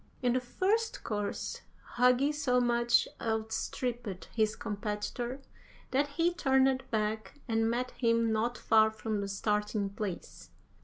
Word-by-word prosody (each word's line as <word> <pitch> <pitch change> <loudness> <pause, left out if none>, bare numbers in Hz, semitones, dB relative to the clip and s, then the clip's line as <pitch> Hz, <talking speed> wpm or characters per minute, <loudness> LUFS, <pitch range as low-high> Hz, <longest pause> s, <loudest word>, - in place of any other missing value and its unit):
In 245 -1 +3
the 255 - +2
first 405 - 0
course 205 -2 -3 0.3
Hugi 250 +4 +4
so 255 -4 +2
much 240 0 +3
outstripped 225 -1 -3
his 215 -1 +1
competitor 215 +5 -4 0.5
that 280 +2 +2
he 330 +5 +1
turned 265 -4 +3
back 220 +2 -2
and 225 -1 +2
met 250 +2 -1
him 230 -2 +2
not 230 +3 0
far 220 -1 +4
from 220 -1 -3
the 200 - -3
starting 210 0 -1
place. 200 -3 -6
230 Hz, 125 wpm, -31 LUFS, 215-255 Hz, 0.5 s, Hugi